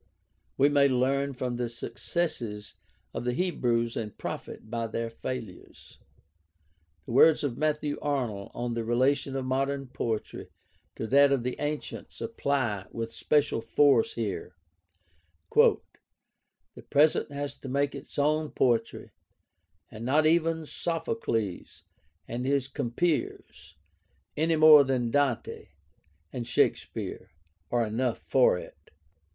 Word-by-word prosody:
We 140 - +5
may 145 -1 +4
learn 135 +2 +1
from 125 -1 -3
the 120 -1 -2
successes 115 -3 -4 0.4
of - - -4
the 125 0 -1
Hebrews 120 -8 0
and 105 -3 -5
profit - - -6
by 115 0 -3
their 115 +1 -3
failures. 115 -5 -8 1.1
The - - -7
words 150 +6 +5
of 135 -5 -1
Matthew 150 -1 -1
Arnold 120 -9 -2
on 120 0 -2
the 115 0 -2
relation 130 +4 +1
of 135 -1 -2
modern 135 +1 -1
poetry 115 -4 -4 0.5
to - - -4
that 140 +4 +5
of 135 -4 +1
the 125 0 -2
ancients 150 0 -5
apply 130 - -1
with 115 0 -5
special 150 -6 +1
force 125 +1 +3
here: 100 -5 -4 1.0
"The - - +6 1.1
present 150 +1 +3
has 145 0 -4
to 135 - -8
make 140 +2 0
its 140 -1 -10
own 155 +1 +1
poetry, 115 -3 0 0.8
and 110 +1 -8
not 145 +6 +3
even 165 0 +2
Sophocles 150 - -3 0.4
and 125 +2 -4
his 140 -1 +1
compeers, 130 - -3 0.6
any 160 +2 +2
more 155 -2 +9
than 125 -3 -1
Dante 140 -4 0 0.7
and 120 -2 -4
Shakespere, - - -1 0.4
are 120 -1 +1
enough 115 +2 -1
for 130 -8 +3
it. - - -12
130 Hz, 125 wpm, -28 LUFS, 115-145 Hz, 1.1 s, more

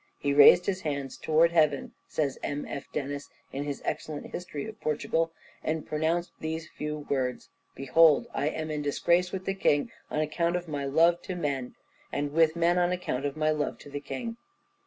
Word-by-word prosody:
"He 140 0 0
raised 145 +5 +8
his 185 -2 -1
hands 140 -4 -3
towards 165 +2 +3
heaven," 155 -4 +2
says 140 -4 -1
M. 145 0 -3
F. 140 - -6
Denis, 145 0 -4 0.2
in 140 +1 -3
his 145 -1 -4
excellent 150 -2 -3
History 165 -5 -5
of 220 -1 -9
Portugal, 160 +2 0 0.3
"and 155 -1 -1
pronounced 160 +3 0
these 160 0 -4
few 150 -1 -5
words: 130 -3 -1 0.3
Behold 150 +3 +5
I 140 +2 0
am 155 0 -3
in 150 -1 -2
disgrace 170 +5 +2
with 190 -1 -4
the 195 - 0
king 145 -7 +2 0.2
on 150 - -1
account 170 +3 0
of 175 -1 -3
my 145 -3 -3
love 165 +5 +4
to 185 - -5
men, 140 -7 -2 0.4
and 145 0 -2
with 160 +1 +4
men 170 +1 +3
on 175 0 +2
account 145 -6 -1
of 140 +2 -6
my 155 0 +2
love 150 -1 -1
to 145 - -13
the 145 0 -4
king. 230 +7 -5
155 Hz, 190 wpm, -28 LUFS, 145-170 Hz, 0.4 s, raised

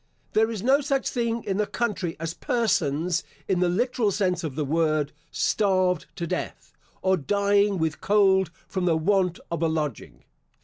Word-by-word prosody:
There 220 +1 +3
is 215 -4 -4
no 270 +4 +4
such 275 -1 0
thing 235 -2 -1
in 195 - -2
the 210 -1 +1
country 205 -8 -2
as 165 0 -3
persons, 180 - 0 0.2
in 185 -2 +1
the 180 -1 +2
literal 230 +3 +1
sense 185 -3 0
of 150 -5 -4
the 150 -1 -1
word, 155 -1 +1 0.2
starved 185 -5 +1
to 170 - -3
death, 180 +2 -5 0.3
or 190 0 +3
dying 200 +4 +2
with 160 -3 -2
cold 190 -3 +3 0.2
from 185 -2 -2
the 165 -3 +3
want 180 +1 +1
of 170 - -2
a 165 - +3
lodging. 155 -6 -4
185 Hz, 170 wpm, -25 LUFS, 165-210 Hz, 0.3 s, no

